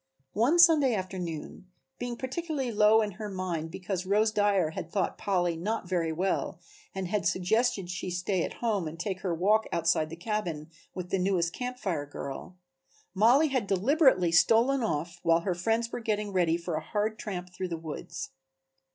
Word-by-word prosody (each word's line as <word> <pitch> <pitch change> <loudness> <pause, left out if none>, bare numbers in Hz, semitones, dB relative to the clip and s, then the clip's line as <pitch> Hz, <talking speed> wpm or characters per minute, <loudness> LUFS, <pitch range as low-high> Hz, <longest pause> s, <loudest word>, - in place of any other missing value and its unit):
One 250 +11 +3
Saturday 310 -8 +6
afternoon, 180 -3 -5 0.3
being 245 -1 -4
particularly 270 -1 -3
low 215 +1 +5
in 210 - -3
her 210 - -4
mind 180 -4 -3
because 185 +1 -4
Rose 210 +3 +2
Dyer 205 -6 +2
had 165 +1 -6
thought 195 -3 0
Polly 175 -4 0
not 200 +4 -3
very 170 -3 0
well 180 0 -1 0.4
and 190 -1 -3
had 210 -2 0
suggested 190 +3 +1
that 175 - -6
she 180 +1 -4
stay 180 +1 -1
at - - -4
home 205 -7 +1
and 160 +2 -8
take 190 +1 -3
her 185 - -2
walk 205 +6 +2
outside 165 -2 +1
the 165 - -7
cabin 170 -5 -3 0.2
with 180 -1 -6
the 195 - +1
newest 180 -2 +1
Camp 250 +3 -4
Fire 165 - -2
girl, 145 +5 -7 0.6
Mollie 245 +10 +5
had 255 -7 -1
deliberately 205 - +3
stolen 230 +10 +4
off 170 -4 -2
while 165 0 +3
her 185 +1 -1
friends 225 +6 0
were - - -4
getting 210 -3 -2
ready 170 -3 +2
for 170 0 -5
a 155 - -1
hard 215 +4 -2
tramp 180 -3 -6
through 185 +1 -3
the 170 -2 -4
woods. 160 -2 -7
190 Hz, 180 wpm, -29 LUFS, 170-220 Hz, 0.6 s, Saturday